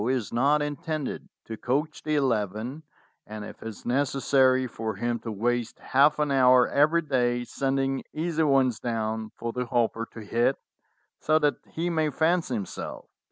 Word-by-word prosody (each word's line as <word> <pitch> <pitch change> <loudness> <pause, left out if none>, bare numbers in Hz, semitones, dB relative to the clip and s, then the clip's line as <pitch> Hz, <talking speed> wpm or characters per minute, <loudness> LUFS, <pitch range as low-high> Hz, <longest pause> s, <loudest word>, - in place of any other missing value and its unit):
is 125 -4 -1
not 145 +5 +3
intended 150 0 -4 0.2
to 115 - -6
coach 145 +7 -2
the 155 0 -1
eleven, 120 0 -1 0.5
and 105 -1 -7
if - - -11
it - - -6
is 110 - -9
necessary 130 0 +2
for 110 -3 -4
him 120 +3 -1
to 115 - -6
waste 120 +2 -1
half 145 +3 +3
an 150 -1 0
hour 130 -2 +5
every 155 +4 +3
day 120 -4 +1
sending 135 +1 -1
easy 160 +1 -1
ones 135 -6 +3
down 110 -2 -2
for 115 0 -4
the 125 -1 -3
Hopper 115 -1 0
to 115 - -9
hit, 120 +5 +1 0.6
so 155 0 +3
that 150 -2 +2
he 165 +2 -3
may 160 -2 +1
fancy 160 -1 +1
himself. 100 -4 -6
130 Hz, 160 wpm, -26 LUFS, 115-145 Hz, 0.6 s, hour